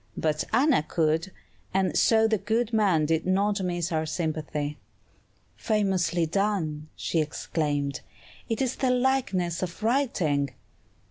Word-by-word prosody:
But 155 Hz, -1 st, 0 dB
Anna 260 Hz, -, +4 dB
could, 160 Hz, +3 st, 0 dB, 0.4 s
and 190 Hz, -4 st, +1 dB
so 225 Hz, -1 st, +4 dB
the 220 Hz, -2 st, +1 dB
good 225 Hz, +3 st, -1 dB
man 190 Hz, -8 st, +3 dB
did 160 Hz, +2 st, 0 dB
not 200 Hz, +2 st, +1 dB
miss 175 Hz, -1 st, -2 dB
our 160 Hz, -1 st, 0 dB
sympathy. 155 Hz, -2 st, -3 dB, 0.8 s
"Famously 190 Hz, -5 st, +1 dB
done!" 160 Hz, -5 st, -1 dB
she 165 Hz, -, -1 dB
exclaimed; 145 Hz, -2 st, -2 dB, 0.5 s
"it 225 Hz, +3 st, 0 dB
is 260 Hz, -1 st, -2 dB
the 260 Hz, -, +1 dB
likeness 245 Hz, -10 st, +1 dB
of 185 Hz, +3 st, -5 dB
writing." 175 Hz, -, +1 dB
180 Hz, 125 wpm, -27 LUFS, 155-220 Hz, 0.8 s, Anna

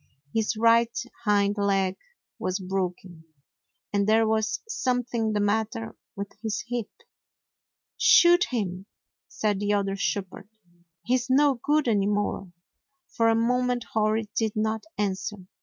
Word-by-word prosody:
His 220 Hz, 0 st, 0 dB
right 230 Hz, +1 st, +4 dB, 0.3 s
hind 205 Hz, 0 st, +2 dB
leg 195 Hz, -2 st, +1 dB, 0.4 s
was 185 Hz, 0 st, -1 dB
broken, 185 Hz, -3 st, -4 dB, 0.7 s
and 200 Hz, 0 st, +1 dB
there 220 Hz, 0 st, +4 dB
was 220 Hz, +1 st, 0 dB
something 245 Hz, -, -1 dB
the 210 Hz, -, 0 dB
matter 205 Hz, -, -1 dB, 0.2 s
with 200 Hz, 0 st, -5 dB
his 215 Hz, -3 st, -3 dB
hip. 240 Hz, -3 st, -3 dB, 1.1 s
"Shoot 350 Hz, +1 st, +6 dB
him,''' 195 Hz, -5 st, -4 dB, 0.4 s
said 210 Hz, -2 st, -1 dB
the 205 Hz, 0 st, 0 dB
other 195 Hz, -1 st, 0 dB
shepherd. 195 Hz, 0 st, -3 dB, 0.5 s
"He's 250 Hz, +5 st, 0 dB
no 280 Hz, +2 st, +4 dB
go'od 300 Hz, -1 st, +2 dB
any 205 Hz, -3 st, +2 dB
more." 205 Hz, -2 st, -1 dB, 0.6 s
For 230 Hz, 0 st, +2 dB
a 225 Hz, -, +3 dB
moment 250 Hz, +1 st, +1 dB
Hori 215 Hz, 0 st, +1 dB
did 220 Hz, -2 st, 0 dB
not 220 Hz, 0 st, -1 dB
answer. 205 Hz, 0 st, -2 dB
215 Hz, 125 wpm, -26 LUFS, 200-230 Hz, 1.1 s, Shoot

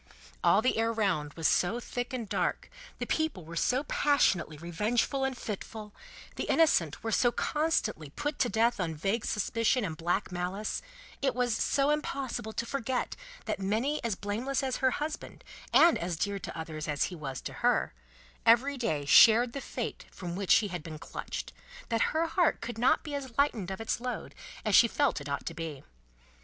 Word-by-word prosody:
All 210 Hz, -, +5 dB
the 255 Hz, -, +2 dB
air 225 Hz, 0 st, +2 dB
round 195 Hz, -10 st, 0 dB
was 165 Hz, -2 st, 0 dB
so 190 Hz, +7 st, +2 dB
thick 245 Hz, +2 st, -4 dB
and 245 Hz, -4 st, -4 dB
dark, -, -, -1 dB, 0.3 s
the -, -, -3 dB
people 315 Hz, -, -1 dB
were 165 Hz, +1 st, -8 dB
so 255 Hz, +10 st, +1 dB
passionately 220 Hz, -, +2 dB
revengeful 210 Hz, -, 0 dB
and 265 Hz, -1 st, -1 dB
fitful, 210 Hz, 0 st, -6 dB, 0.4 s
the -, -, -2 dB
innocent 175 Hz, -, +3 dB
were 225 Hz, -, -2 dB
so 240 Hz, +2 st, +3 dB
constantly 240 Hz, -, 0 dB
put 295 Hz, -, -4 dB
to 245 Hz, -, +2 dB
death 230 Hz, +1 st, +2 dB
on 165 Hz, -3 st, -1 dB
vague 200 Hz, +8 st, -1 dB
suspicion 230 Hz, +3 st, +1 dB
and 165 Hz, -4 st, -4 dB
black 175 Hz, +5 st, -1 dB
malice, 180 Hz, +4 st, -3 dB, 0.4 s
it 270 Hz, -3 st, +1 dB
was 245 Hz, -2 st, +1 dB
so 280 Hz, +1 st, +2 dB
impossible 270 Hz, -6 st, -2 dB
to 235 Hz, -, -3 dB
forget 260 Hz, 0 st, -2 dB, 0.3 s
that -, -, -2 dB
many 225 Hz, +10 st, 0 dB
as 230 Hz, -4 st, 0 dB
blameless 230 Hz, +9 st, -2 dB
as 260 Hz, -1 st, -1 dB
her 260 Hz, -, +3 dB
husband 300 Hz, +4 st, -5 dB, 0.3 s
and 340 Hz, -1 st, +6 dB
as 175 Hz, 0 st, -2 dB
dear 200 Hz, +3 st, -1 dB
to 170 Hz, -, -7 dB
others 160 Hz, -1 st, -5 dB
as 145 Hz, -1 st, +1 dB
he -, -, -5 dB
was 135 Hz, -5 st, -5 dB
to -, -, -6 dB
her, -, -, +2 dB, 0.5 s
every 255 Hz, +5 st, +4 dB
day 155 Hz, -, -1 dB
shared 235 Hz, +9 st, +7 dB
the 275 Hz, -, -4 dB
fate -, -, -5 dB
from 175 Hz, -2 st, -6 dB
which 195 Hz, 0 st, +4 dB
he 210 Hz, -3 st, +2 dB
had 180 Hz, -2 st, -4 dB
been 155 Hz, 0 st, -8 dB
clutched, -, -, -6 dB, 0.4 s
that 230 Hz, -1 st, +1 dB
her 320 Hz, +1 st, +1 dB
heart 335 Hz, +1 st, +2 dB
could 235 Hz, -1 st, -6 dB
not 250 Hz, +3 st, +3 dB
be 300 Hz, -, -6 dB
as 265 Hz, -4 st, -5 dB
lightened 240 Hz, -10 st, +1 dB
of 190 Hz, -, -5 dB
its 225 Hz, +1 st, -2 dB
load 250 Hz, 0 st, -4 dB, 0.3 s
as 215 Hz, -, +1 dB
she 235 Hz, -, +8 dB
felt 275 Hz, -, +1 dB
it 145 Hz, -, -7 dB
ought 140 Hz, -, -3 dB
to -, -, -4 dB
be. 160 Hz, -5 st, -6 dB
225 Hz, 190 wpm, -30 LUFS, 180-260 Hz, 0.5 s, she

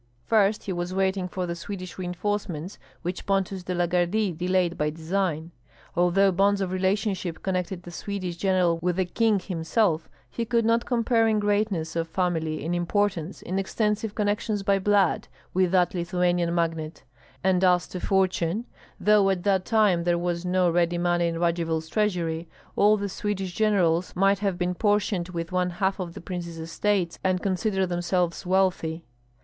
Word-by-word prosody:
First, 210 Hz, -1 st, +2 dB
he 190 Hz, -, -3 dB
was 175 Hz, +1 st, -3 dB
waiting 190 Hz, -1 st, +1 dB
for 180 Hz, 0 st, -3 dB
the 170 Hz, -, -3 dB
Swedish 185 Hz, +1 st, -7 dB
reinforcements, 180 Hz, -1 st, -3 dB, 0.2 s
which 180 Hz, +1 st, -4 dB
Pontus 195 Hz, -1 st, 0 dB
de 180 Hz, 0 st, -4 dB
la 175 Hz, 0 st, +2 dB
Gardie 180 Hz, +4 st, +1 dB
delayed 180 Hz, +1 st, 0 dB
by 150 Hz, -1 st, 0 dB
design. 165 Hz, 0 st, -2 dB, 0.4 s
Although 180 Hz, +3 st, +4 dB
bonds 200 Hz, +2 st, +2 dB
of 190 Hz, -2 st, -2 dB
relationship 190 Hz, -2 st, -1 dB
connected 185 Hz, -1 st, -2 dB
the 175 Hz, -, -9 dB
Swedish 185 Hz, -1 st, -4 dB
general 180 Hz, -2 st, +2 dB
with 180 Hz, 0 st, 0 dB
the 190 Hz, 0 st, +1 dB
king 220 Hz, +3 st, +2 dB
himself, 175 Hz, -1 st, 0 dB, 0.2 s
he 235 Hz, -, -4 dB
could 230 Hz, 0 st, +1 dB
not 230 Hz, +1 st, +2 dB
compare 230 Hz, -2 st, +2 dB
in 220 Hz, -1 st, +2 dB
greatness 205 Hz, -6 st, 0 dB
of 165 Hz, 0 st, -1 dB
family, 160 Hz, -4 st, -1 dB
in 170 Hz, -, -1 dB
importance, 180 Hz, 0 st, -1 dB
in 190 Hz, +2 st, -2 dB
extensive 210 Hz, +2 st, -1 dB
connections 205 Hz, 0 st, -1 dB
by 195 Hz, 0 st, +2 dB
blood, 200 Hz, -2 st, +2 dB, 0.3 s
with 185 Hz, -1 st, +3 dB
that 180 Hz, -1 st, +2 dB
Lithuanian 175 Hz, -1 st, 0 dB
magnate; 165 Hz, -2 st, -2 dB, 0.4 s
and 190 Hz, -1 st, +2 dB
as 180 Hz, -1 st, +4 dB
to 180 Hz, -, -5 dB
fortune, 190 Hz, +2 st, 0 dB, 0.3 s
though 210 Hz, -2 st, +4 dB
at 185 Hz, -2 st, -1 dB
that 190 Hz, -2 st, +2 dB
time 210 Hz, -6 st, +3 dB
there 175 Hz, 0 st, +2 dB
was 175 Hz, 0 st, -2 dB
no 180 Hz, 0 st, +2 dB
ready 175 Hz, 0 st, +1 dB
money 175 Hz, 0 st, +1 dB
in 165 Hz, 0 st, -2 dB
Radzivill's 165 Hz, -2 st, 0 dB
treasury, 170 Hz, -6 st, -1 dB, 0.3 s
all 210 Hz, +1 st, +5 dB
the 200 Hz, 0 st, -2 dB
Swedish 195 Hz, -1 st, -3 dB
generals 185 Hz, -5 st, +1 dB
might 195 Hz, +2 st, +3 dB
have 195 Hz, -3 st, -1 dB
been 180 Hz, 0 st, 0 dB
portioned 205 Hz, -3 st, 0 dB
with 170 Hz, -1 st, -5 dB
one 180 Hz, 0 st, +1 dB
half 190 Hz, +2 st, -1 dB
of 175 Hz, -2 st, -5 dB
the -, -, -8 dB
prince's 170 Hz, -2 st, -6 dB
estates 170 Hz, +2 st, -1 dB
and 185 Hz, -1 st, +1 dB
consider 190 Hz, 0 st, 0 dB
themselves 175 Hz, -1 st, -1 dB
wealthy. 180 Hz, -3 st, +1 dB
185 Hz, 165 wpm, -26 LUFS, 175-200 Hz, 0.4 s, all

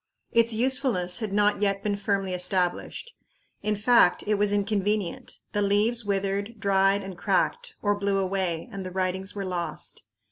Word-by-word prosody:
Its 230 Hz, 0 st, +3 dB
usefulness 230 Hz, -7 st, +1 dB
had 220 Hz, -3 st, -3 dB
not 205 Hz, 0 st, +2 dB
yet 200 Hz, -1 st, +1 dB
been 205 Hz, -1 st, 0 dB
firmly 195 Hz, -2 st, -1 dB
established. 180 Hz, -, -1 dB, 0.5 s
In 210 Hz, +1 st, 0 dB
fact 235 Hz, +4 st, +4 dB
it 210 Hz, -, +1 dB
was 205 Hz, 0 st, +2 dB
inconvenient; 205 Hz, -2 st, -1 dB
the 205 Hz, -, 0 dB
leaves 210 Hz, +4 st, +2 dB
withered, 200 Hz, +2 st, -2 dB
dried, 195 Hz, 0 st, +2 dB
and 190 Hz, -1 st, -7 dB
cracked, 485 Hz, -, 0 dB
or 205 Hz, -1 st, +3 dB
blew 200 Hz, -1 st, 0 dB
away, 190 Hz, -2 st, -1 dB
and 195 Hz, -2 st, -5 dB
the 185 Hz, -, -5 dB
writings 190 Hz, +1 st, -2 dB
were 200 Hz, -1 st, -3 dB
lost. 180 Hz, -2 st, -4 dB
200 Hz, 155 wpm, -26 LUFS, 190-215 Hz, 0.5 s, fact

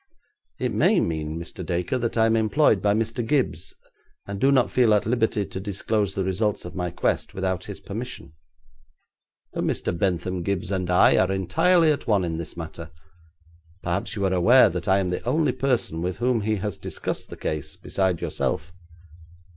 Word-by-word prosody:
'It -, -, -2 dB
may -, -, +4 dB
mean, 80 Hz, -1 st, -2 dB
Mr. 85 Hz, +2 st, -7 dB
Dacre, 90 Hz, +8 st, -1 dB
that 115 Hz, -1 st, -2 dB
I 110 Hz, -, +5 dB
am 115 Hz, 0 st, +3 dB
employed 110 Hz, 0 st, +3 dB
by 100 Hz, 0 st, +2 dB
Mr. 115 Hz, +2 st, -1 dB
Gibbes, 115 Hz, -, -1 dB, 0.5 s
and 100 Hz, 0 st, -6 dB
do 135 Hz, -, +5 dB
not 130 Hz, -3 st, +3 dB
feel 120 Hz, -4 st, +4 dB
at 105 Hz, -, +1 dB
liberty 110 Hz, -2 st, +1 dB
to 95 Hz, 0 st, -6 dB
disclose 100 Hz, 0 st, -1 dB
the 95 Hz, -, 0 dB
results 95 Hz, +2 st, -1 dB
of 85 Hz, -, -7 dB
my 90 Hz, -1 st, -2 dB
quest 85 Hz, -, -1 dB
without 95 Hz, -1 st, -2 dB
his 100 Hz, -, -7 dB
permission.' 115 Hz, -, -7 dB, 1.2 s
'But -, -, -2 dB
Mr. -, -, -1 dB
Bentham 90 Hz, 0 st, -1 dB
Gibbes 100 Hz, +3 st, -2 dB
and 90 Hz, -2 st, -1 dB
I 90 Hz, -, +5 dB
are -, -, +3 dB
entirely 160 Hz, -, +3 dB
at 145 Hz, -, -3 dB
one 100 Hz, -5 st, +2 dB
in 80 Hz, -1 st, -3 dB
this 85 Hz, +1 st, -7 dB
matter. 80 Hz, 0 st, -7 dB, 0.9 s
Perhaps 85 Hz, +5 st, -2 dB
you 100 Hz, -2 st, -1 dB
are 95 Hz, -, +1 dB
aware 115 Hz, +9 st, +6 dB
that -, -, -5 dB
I 95 Hz, 0 st, +4 dB
am 95 Hz, -2 st, 0 dB
the 90 Hz, -, -2 dB
only 145 Hz, +3 st, +1 dB
person 125 Hz, -11 st, 0 dB
with 90 Hz, +1 st, -2 dB
whom 120 Hz, -1 st, +1 dB
he 110 Hz, +1 st, 0 dB
has 100 Hz, -3 st, -4 dB
discussed -, -, -4 dB
the -, -, -9 dB
case 75 Hz, -2 st, -4 dB
beside 95 Hz, -3 st, -1 dB
yourself.' 80 Hz, +2 st, -2 dB
100 Hz, 185 wpm, -24 LUFS, 90-115 Hz, 1.2 s, aware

